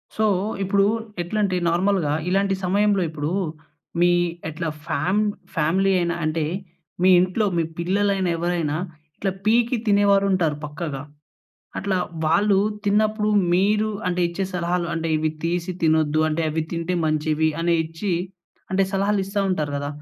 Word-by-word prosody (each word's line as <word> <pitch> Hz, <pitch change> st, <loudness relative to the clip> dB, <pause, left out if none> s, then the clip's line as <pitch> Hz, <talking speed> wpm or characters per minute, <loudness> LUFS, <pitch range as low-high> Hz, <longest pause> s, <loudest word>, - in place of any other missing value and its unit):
So, 220 Hz, -, +1 dB, 0.4 s
ఇప్పుడు 195 Hz, +1 st, +3 dB, 0.4 s
ఎట్లంటే 190 Hz, +1 st, 0 dB
నార్మల్‌గా 175 Hz, -3 st, +1 dB, 0.2 s
ఇలాంటి 195 Hz, +1 st, +2 dB
సమయంలో 200 Hz, +1 st, +2 dB
ఇప్పుడు 155 Hz, 0 st, -3 dB, 0.7 s
మీ 175 Hz, 0 st, +5 dB, 0.4 s
ఎట్లా 160 Hz, +1 st, -3 dB, 0.2 s
ఫ్యాం 180 Hz, +8 st, 0 dB, 0.4 s
ఫ్యామిలీ 180 Hz, +5 st, +2 dB
అయినా 170 Hz, -1 st, 0 dB
అంటే, 155 Hz, 0 st, 0 dB, 0.6 s
మీ 185 Hz, -, +5 dB
ఇంట్లో 185 Hz, +4 st, +1 dB
మీ 165 Hz, -, +2 dB, 0.2 s
పిల్లలైనా 195 Hz, +1 st, +1 dB
ఎవరైనా 170 Hz, -3 st, -1 dB, 0.4 s
ఇట్లా 195 Hz, -1 st, -1 dB
పీకి 235 Hz, +3 st, +3 dB
తినేవారుంటారు 200 Hz, -5 st, +3 dB
పక్కాగా. 150 Hz, -2 st, -5 dB, 0.8 s
అట్లా 195 Hz, -1 st, -1 dB, 0.3 s
వాళ్ళు 200 Hz, +5 st, +3 dB, 0.3 s
తిన్నప్పుడు 215 Hz, +1 st, +2 dB, 0.3 s
మీరు 210 Hz, +3 st, +2 dB, 0.2 s
అంటే, 180 Hz, 0 st, -1 dB
ఇచ్చే 170 Hz, +3 st, -3 dB
సలహాలు 175 Hz, 0 st, 0 dB
అంటే 165 Hz, 0 st, -2 dB
ఇవి 155 Hz, 0 st, 0 dB
తీసి 175 Hz, +1 st, -1 dB
తినొద్దు 155 Hz, -1 st, +3 dB
అంటే, 155 Hz, +1 st, -1 dB
అవి 160 Hz, +1 st, -1 dB
తింటే 170 Hz, +2 st, -1 dB
మంచివి 155 Hz, +1 st, +1 dB
అని 170 Hz, 0 st, +2 dB
ఇచ్చి 165 Hz, +4 st, -4 dB, 0.6 s
అంటే 195 Hz, +1 st, +3 dB
సలహాలు 200 Hz, +1 st, +1 dB
ఇస్తా 200 Hz, +1 st, -2 dB
ఉంటారు 155 Hz, -5 st, -1 dB
కదా! 145 Hz, 0 st, -3 dB
180 Hz, 130 wpm, -23 LUFS, 160-200 Hz, 0.8 s, మీ